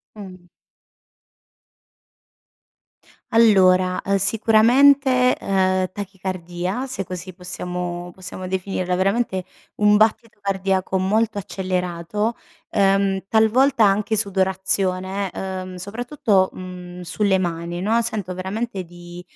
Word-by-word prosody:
Mh. 185 -4 -11 2.8
Allora, 185 -5 +4
uhm, 195 +1 +2
sicuramente, 250 +5 +4
uhm, 185 -1 +1
tachicardia 185 +2 -4
se 250 -7 -4
così 185 0 -7
possiamo 180 -1 -5
possiamo 185 0 -8
definirla, 185 -1 -2
veramente, 190 0 0 0.3
un 210 0 +4
battito 220 0 +1
cardiaco 195 -1 -1
molto 215 +4 +1
accelerato, 185 +2 -2 0.3
uhm, 195 -1 +2
talvolta 225 +3 +4
anche 210 +2 +2
sudorazione, 190 -1 0
uhm, 185 -1 -5
soprattutto, 210 0 0
mhmm, 180 -1 -9
sulle 190 +3 +1
mani 175 0 -3
no, 225 +3 +2
sento 210 -5 -3
veramente 195 +2 -4
di, 175 +1 -11
190 Hz, 95 wpm, -21 LUFS, 185-210 Hz, 2.8 s, Allora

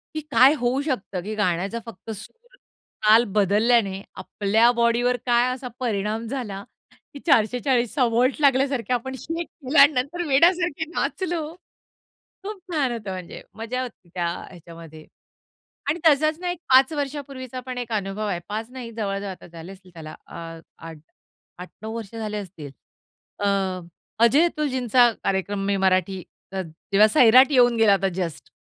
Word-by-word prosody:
की 310 - -2
काय 255 +3 +6
होऊ 250 +3 0
शकतं, 200 - -3
की 215 +3 -5
गाण्याचा 195 +2 -1
फक्त 225 -2 -11
सूर-ताल 230 - -1
बदलल्याने 205 0 +2 0.2
आपल्या 220 +4 +2
बॉडीवर 240 +1 +2
काय 240 0 +3
असा 255 0 -7
परिणाम 220 -2 -2
झाला 215 -7 -5 0.5
की 285 - -9
440चा 250 -1 +2
व्होल्ट 245 +3 +2
लागल्यासारखे 270 -2 +2
आपण 265 +2 -3
शेक 330 +6 -5
केलं 280 0 -1
आणि 280 +2 +8
नंतर 285 +7 -2
वेड्यासारखे 335 +2 +3
नाचलो. 335 -4 -3 0.9
खूप 415 0 -6
छान 280 -6 0
होतं 215 -4 -5
म्हणजे 185 -1 -8
मजा 230 +4 -4
होती 235 -8 -10
त्या 175 -2 -1 0.2
ह्याच्यामध्ये. 165 -3 -13 0.8
आणि 310 - 0
तसाच 310 +1 +4
ना 360 -1 -2
एक 355 - -5
5 260 +4 +6
वर्षापूर्वीचा 275 -3 -5
पण 255 -1 -5
एक 240 -2 -5
अनुभव 205 0 -2
आहे. 180 -4 -2
5 220 +3 -5
नाही 250 -2 -8
जवळ-जवळ 200 -2 -3
आता 185 - -10
झाले 170 +2 -11
असतील, 185 -1 -16
त्याला 155 -2 -9
अ, - - -14 0.5
8 160 +2 -15
8-9 220 +4 -9
वर्ष 225 -1 -8
झाले 215 -2 -4
असतील. 165 -7 -9 0.7
अ, 205 - -1 0.8
अजय 275 +8 +5
अतुलजींचा 260 -7 +2
कार्यक्रम 195 +1 -1
मी 200 - +1
मराठी 190 -1 +1 0.3
ज - - -4 0.4
जेव्हा 210 +2 +6
सैराट 255 +5 +6
येऊन 245 -2 +4
गेला 220 -2 +5
होता 195 0 +2
जस्ट 170 -5 -5
235 Hz, 145 wpm, -23 LUFS, 195-265 Hz, 0.9 s, आणि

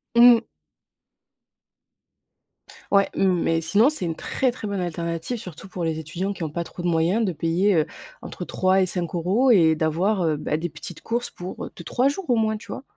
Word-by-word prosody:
Mmh. 235 -1 +8 2.5
Ouais 200 -1 +4
mais 175 -3 +2
sinon 200 - +4
c'est 305 -12 -4
une 165 -1 -2
très, 260 +8 0
très 230 -3 -7
bonne 200 -1 -2
alternative. 170 +5 -3
Surtout 185 -4 -9
pour 180 -2 -5
les 160 -1 -1
étudiants 170 +6 -3
qui 180 - -6
ont 160 - -2
pas 170 +3 -3
trop 175 - -9
de 175 - -1
moyens. 170 +6 +2
De 190 - 0
payer, 170 +6 +1
heu, 155 -2 +3 0.4
entre - - -7
3 185 +1 +2
et - - +3
5 175 -2 -3
euros 195 +10 +2
et 165 -7 +5
d'avoir, 175 +6 +1
heu, 155 -2 +1
beh, 150 +1 -2
des 175 +2 -3
petites 165 +1 -9
courses 235 +1 -2
pour, 180 +1 -7
heu, - - -9
2-3 240 +10 0
jours 290 +4 -3
au 245 - +4
moins, 220 -1 +1
tu 215 - -11
vois? - - -6
180 Hz, 200 wpm, -24 LUFS, 165-215 Hz, 2.5 s, Mmh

